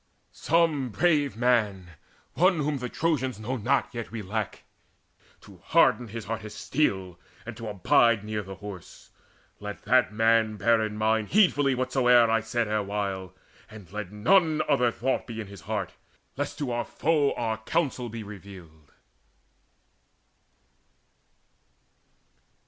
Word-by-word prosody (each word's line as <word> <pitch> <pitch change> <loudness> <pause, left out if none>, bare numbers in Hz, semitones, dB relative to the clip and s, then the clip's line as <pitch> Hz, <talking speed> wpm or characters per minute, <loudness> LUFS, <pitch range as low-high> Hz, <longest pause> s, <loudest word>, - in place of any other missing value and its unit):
Some 160 -5 +1
brave 145 -1 +1
man, 105 -7 +1 0.4
One 185 +2 +3
whom 145 -1 -1
the 125 -1 -4
Trojans 130 -9 -1
know 120 +4 -3
not, 130 +5 0
yet 115 -1 -5
we 115 -2 -6
lack, 105 +2 -4 0.8
To - - -15
harden 120 - +3
his 115 0 -7
heart 115 0 -4
as 105 - -9
steel, 95 - -1 0.3
and 120 0 -7
to 115 0 -7
abide 110 +2 +3
Near 105 0 -3
by 100 - -13
the 95 - -7
Horse. 95 -3 -11 0.5
Let 105 -1 -7
that 125 +2 +3
man 110 0 +2
bear 115 +2 +3
in 105 -1 -4
mind 110 0 +1
Heedfully 145 -10 +3
whatsoe'er 125 -2 +4
I 115 - +3
said 115 +1 -2
erewhile. 100 -3 -3 0.3
And 105 -5 -13
let 105 -2 -6
none 155 - +3
other 125 -5 +3
thought 130 +3 -2
be 115 -2 -6
in 110 - -4
his 100 -3 -12
heart, 100 -1 -4 0.4
Lest - - -4
to 145 - -2
the 120 -2 -2
foe 150 -3 +1
our 110 -2 -2
counsel 130 -1 -1
be 115 0 -7
revealed." 95 -7 -12
115 Hz, 140 wpm, -27 LUFS, 105-130 Hz, 0.8 s, whatsoe'er